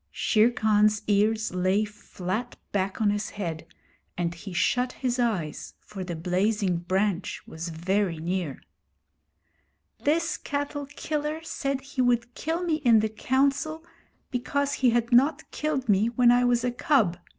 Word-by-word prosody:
Shere 220 +1 +3
Khan's 215 -2 +2
ears 215 0 +2
lay 185 +3 +2
flat 210 +2 -5 0.2
back 195 -1 -1
on 210 -2 +3
his 205 +1 -2
head, 170 -6 -5 0.5
and 170 -1 -1
he 180 +3 -9
shut 250 +7 +1
his 250 -1 -2
eyes, 200 -11 -2
for 195 -3 -8
the 175 -2 -5
blazing 185 +3 0
branch 190 +2 -1
was 165 +2 -6
very 180 +2 0
near. 170 -3 -3 1.4
'This 330 +3 +1
cattle 285 0 -3
killer 300 +2 -3
said 275 -4 -2
he 275 -1 -3
would 240 -1 +1
kill 330 +6 -2
me 325 -3 +1
in 235 -8 +4
the 220 - 0
Council 275 +8 0 0.5
because 280 +3 -1
he 260 -4 +3
had 235 0 +1
not 270 +6 +3
killed 300 -4 -2
me 205 +1 +3
when 240 0 +4
I 245 0 +4
was 240 -1 +2
a 250 - +1
cub. 240 - +2
220 Hz, 150 wpm, -26 LUFS, 190-265 Hz, 1.4 s, in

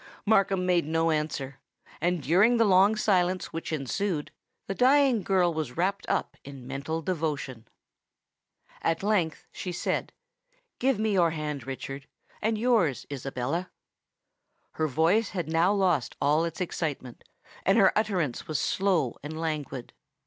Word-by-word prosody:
Markham 195 -3 +3
made 175 -4 +2
no 165 +1 +1
answer; 145 -3 -3 0.4
and 175 -2 0
during 200 - +4
the 230 - +4
long 195 +2 +5
silence 185 -3 +1
which 165 0 -5
ensued, 155 +3 -2 0.3
the 195 - -3
dying 260 0 +4
girl 180 -2 +2
was 155 -5 -4
wrapt 195 +3 -1
up - - -1
in 135 -2 -10
mental 140 +5 -4
devotion. 150 -9 -3 1.1
At 165 +2 0
length 190 -7 0
she 180 - -5
said, 175 - -2 0.7
"Give 265 -2 +2
me 215 0 0
your 175 -3 +4
hand, 150 -5 -4
Richard—and 140 +11 -5
yours, 215 - +2
Isabella." 135 +6 -3 1.0
Her 155 - -1
voice 165 - +2
had 175 -6 -3
now 165 +4 +3
lost 185 -10 +1
all 150 +4 +2
its 165 -1 -5
excitement; 150 -8 -4 0.4
and 195 - +3
her 195 -4 +5
utterance 185 - -1
was 155 -2 -1
slow 180 -11 0
and 155 +2 -6
languid. 150 -6 -4
165 Hz, 135 wpm, -27 LUFS, 150-195 Hz, 1.1 s, long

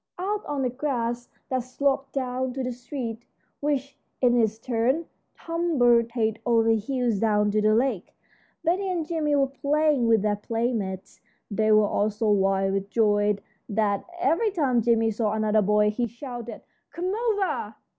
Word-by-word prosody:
Out 405 +3 -2
on 285 -2 -2
the 250 - +1
grass 245 -3 -2 0.2
that 260 - 0
sloped 270 +2 -1
down 255 -1 -2
to 265 0 -3
the 250 - -2
street, 245 -2 -6 0.4
which, 280 -1 -2 0.2
in 245 -2 +3
its 220 -2 +2
turn, 250 +7 0 0.3
tumbled 245 -9 +2
head 220 -2 0
over 230 -2 +3
heels 235 0 0
down 210 -1 +2
to 215 +1 +1
the 215 0 +3
lake, 235 -6 -1 0.5
Betty 370 +4 +1
and 345 -4 -1
Jimmie 305 -2 0
were 275 -1 +4
playing 285 -1 +1
with 225 -3 +3
their 210 -1 +1
playmates. 210 -4 -3 0.3
They 215 +1 +2
were 215 0 +6
all 205 +1 +1
so 215 0 0
wild 195 -1 +2
with 195 0 -2
joy 205 -2 +2 0.3
that 205 -1 0 0.2
every 365 +5 +2
time 275 - +1
Jimmie 225 -1 +2
saw 215 -1 -1
another 215 0 +2
boy 210 +1 +3
he 240 +3 -1
shouted, 240 -2 -8 0.3
"Come 365 +3 -3
over!" 430 -3 -1
240 Hz, 160 wpm, -25 LUFS, 215-275 Hz, 0.5 s, were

